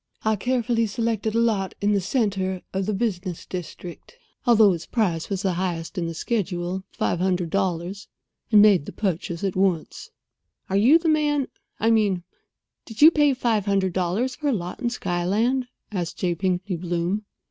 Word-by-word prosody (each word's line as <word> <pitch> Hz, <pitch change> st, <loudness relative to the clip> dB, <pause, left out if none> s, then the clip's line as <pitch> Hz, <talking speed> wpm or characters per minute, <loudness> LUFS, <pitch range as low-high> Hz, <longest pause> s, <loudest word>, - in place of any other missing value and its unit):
I 220 Hz, 0 st, +3 dB
carefully 235 Hz, 0 st, 0 dB
selected 225 Hz, 0 st, -1 dB
a -, -, +3 dB
lot 210 Hz, -5 st, 0 dB
in 205 Hz, +1 st, +1 dB
the 200 Hz, -1 st, +2 dB
centre 190 Hz, -4 st, -1 dB
of 190 Hz, 0 st, -1 dB
the 215 Hz, -, 0 dB
business 190 Hz, -5 st, -3 dB
district, 180 Hz, -, -8 dB, 0.3 s
although 220 Hz, -4 st, +6 dB
its 170 Hz, -, -6 dB
price 180 Hz, -9 st, 0 dB
was 195 Hz, 0 st, -2 dB
the 190 Hz, -2 st, +1 dB
highest 170 Hz, -1 st, -3 dB
in 175 Hz, -3 st, -2 dB
the 165 Hz, -, -5 dB
schedule—five 185 Hz, -3 st, -2 dB
hundred 180 Hz, -2 st, 0 dB
dollars—and 195 Hz, +3 st, -1 dB
made 195 Hz, -8 st, +5 dB
the -, -, -7 dB
purchase 175 Hz, -3 st, -2 dB
at 195 Hz, -2 st, -1 dB
once." 185 Hz, -4 st, -1 dB, 0.6 s
"Are -, -, +1 dB
you 240 Hz, +11 st, +6 dB
the 335 Hz, 0 st, -3 dB
man—I 295 Hz, -7 st, 0 dB
mean, 205 Hz, -5 st, +2 dB, 0.6 s
did 225 Hz, +4 st, -1 dB
you 320 Hz, -, +10 dB
pay 295 Hz, -4 st, +3 dB
five 225 Hz, -5 st, 0 dB
hundred 195 Hz, -2 st, +1 dB
dollars 190 Hz, +8 st, 0 dB
for 300 Hz, -, -3 dB
a 280 Hz, -, +3 dB
lot 180 Hz, -4 st, -4 dB
in 240 Hz, -, 0 dB
Skyland" 225 Hz, +5 st, 0 dB, 0.2 s
asked 180 Hz, -5 st, -3 dB
J. 175 Hz, -2 st, 0 dB
Pinkney 185 Hz, +1 st, -1 dB
Bloom. 175 Hz, +4 st, -2 dB
195 Hz, 165 wpm, -24 LUFS, 180-230 Hz, 0.6 s, you